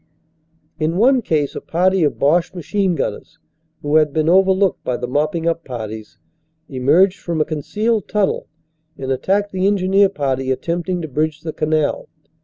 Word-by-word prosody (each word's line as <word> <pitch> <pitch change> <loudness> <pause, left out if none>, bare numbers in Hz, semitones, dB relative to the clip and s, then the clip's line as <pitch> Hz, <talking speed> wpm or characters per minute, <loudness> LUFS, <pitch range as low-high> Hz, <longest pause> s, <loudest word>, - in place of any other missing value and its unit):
In 160 +2 0
one 255 +4 +4
case 150 -9 -1
a - - -5
party 185 +2 +1
of 145 - 0
Boche 165 +6 +1
machine 180 +2 -1
gunners, - - -4 0.5
who 145 +1 +3
had 155 -2 +3
been 155 +1 0
overlooked 190 +1 +3
by 125 - -2
the 125 - -4
mopping 155 +5 -1
up 165 0 -1
parties, 110 -3 -7 0.5
emerged 155 +9 +2
from 170 -2 -3
a 155 - +2
concealed 210 +9 -1
tunnel 210 -2 0 0.5
and 135 0 -4
attacked 200 +9 0
the 190 +1 0
engineer 195 0 +3
party 135 -6 -2
attempting 170 +6 -2
to - - -4
bridge 155 +2 -2
the 160 -2 -5
canal. 155 -1 -1
165 Hz, 160 wpm, -19 LUFS, 145-190 Hz, 0.5 s, one